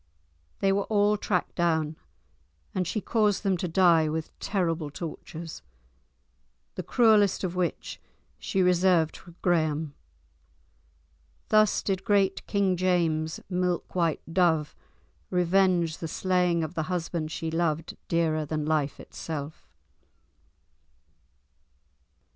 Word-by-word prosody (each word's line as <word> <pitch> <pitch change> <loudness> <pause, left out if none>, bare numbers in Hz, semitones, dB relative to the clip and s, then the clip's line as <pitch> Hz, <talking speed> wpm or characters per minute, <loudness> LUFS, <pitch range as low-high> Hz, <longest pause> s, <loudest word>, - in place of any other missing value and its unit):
They 195 - +3
were 200 0 +1
all 210 -1 +3
tracked 195 -3 -1
down, 160 -3 0 0.8
and 185 -2 -1
she 215 +4 -2
caused 210 -3 +1
them 195 -2 +2
to 180 - -2
die 165 -3 +4
with 160 0 -3
terrible 165 -6 -1
tortures, 165 +1 -7 1.1
the - - -4
cruellest 215 -6 +3
of 185 -1 -2
which 180 -1 -3 0.4
she 190 -2 0
reserved 180 -2 +3
for 175 -2 -14
Graham. 155 -4 +1 1.6
Thus 215 -1 +4
did 190 -1 -1
great 200 -3 +1
King 200 -3 +1
James's 165 -3 0
"milk 180 -2 -1
white 170 -4 0
dove" 165 -4 +2 0.5
revenge 180 -2 +2
the 165 - -4
slaying 180 0 +1
of 160 - -5
the 160 -1 -3
husband 165 -3 -2
she 165 0 -3
loved 165 -1 -1
dearer 160 -2 +1
than 150 0 -3
life 150 -2 0
itself. 155 -1 -7
175 Hz, 115 wpm, -27 LUFS, 160-190 Hz, 1.6 s, die